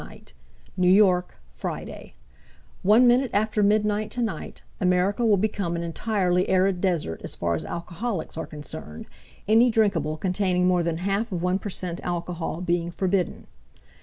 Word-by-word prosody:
uk - - -13 0.4
New 180 -1 +3
York, 185 -2 +3 0.2
FridayOne - - -6 0.9
minute 250 +1 +4
after 215 +1 +1
midnight 210 +1 +2
tonight 235 -4 -4 0.2
America 185 +4 +1
will 215 -3 +4
become 195 -4 -1
an 170 - -3
entirely 180 +1 0
arid 185 -1 +2
desert 170 - -1
as - - -5
far 85 0 -1
as 80 - -3
alcoholics 175 +2 -4
are 160 - -4
concerned, 145 - -8 0.4
any 225 +4 +5
drinkable 200 -9 +1
containing 180 0 +1
more 180 -1 +3
than 170 -1 -1
half 200 +5 -1
of 175 -2 -3
1 180 +1 +1
per 205 - -5
cent 180 -2 -4
alcohol 175 -1 -4
being 170 -1 0
forbidden. 180 +1 -1
185 Hz, 145 wpm, -25 LUFS, 170-205 Hz, 0.9 s, any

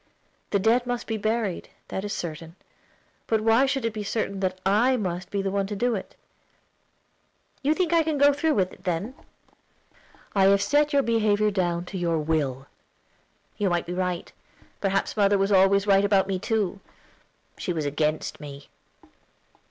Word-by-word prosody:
"The 200 - +2
dead 230 +5 +2
must 245 -1 -2
be 225 - -2
buried, 215 -3 -2 0.2
that 190 - -4
is 205 - -4
certain; 165 -2 -6 0.7
but 220 - +2
why 225 +5 +4
should 270 -3 -1
it 230 - -1
be 215 - -4
certain 200 -1 -2
that 185 -1 -2
I 235 +7 +3
must 180 -3 -3
be 200 -1 -2
the 195 - -1
one 195 0 0
to 205 - -4
do 245 +4 +1
it?" 195 - -6 1.5
"You 295 +3 +2
think 350 -2 0
I 335 - +5
can 315 -2 -1
go 285 +1 +5
through 305 +2 +1
with 185 -3 0
it, - - -17
then?" 185 +7 -2 1.2
"I 195 -2 +4
have 200 +1 +5
set 290 +8 +2
your 280 -2 +3
behavior 215 -3 +2
down 175 -3 -1
to 190 +1 -6
your 170 -2 0
will." 150 -4 -1 0.9
"You 205 -2 +2
may 175 -1 0
be 175 - -6
right. 180 -1 -3 0.5
Perhaps 195 0 0
mother 200 -1 +3
was 195 +1 +1
always 195 +1 +4
right 195 -1 +4
about 200 -1 +3
me 190 -1 -1
too; 205 -2 -1 0.8
she - - -2
was 160 -3 -2
against 150 +2 -1
me." 140 -1 -10
200 Hz, 175 wpm, -25 LUFS, 180-225 Hz, 1.5 s, I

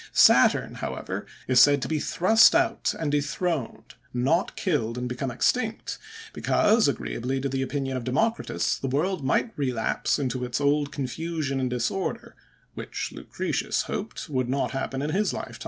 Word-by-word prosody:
Saturn, - - +5
however, - - -4 0.2
is 130 -1 +5
said 145 +2 +6
to - - -2
be 155 -1 -1
thrust 220 - +5
out 345 0 +1
and 155 -3 -1
dethroned, 150 -1 -2 0.2
not 140 +9 +1
killed, 125 - -1
and 125 0 -3
become 125 +2 -3
extinct; 220 - -1 0.3
because, 220 -2 +3
agreeably 130 0 -2
to 135 - -1
the 135 0 -2
opinion 135 0 -2
of 130 - -3
Democritus, 220 - 0
the 135 - -3
world 155 +5 -1
might 135 - +1
relapse 125 -6 0
into 130 -3 -2
its 125 +1 -2
old 145 0 +1
confusion 145 +1 -3
and 130 -1 0
disorder, 125 +10 -3 0.4
which - - -5
Lucretius - - -2
hoped 215 -2 -5
would 130 -5 -1
not 135 +1 0
happen 135 0 -3
in 150 - -1
his 205 +4 +1
time. - - -6
140 Hz, 155 wpm, -26 LUFS, 130-170 Hz, 0.4 s, said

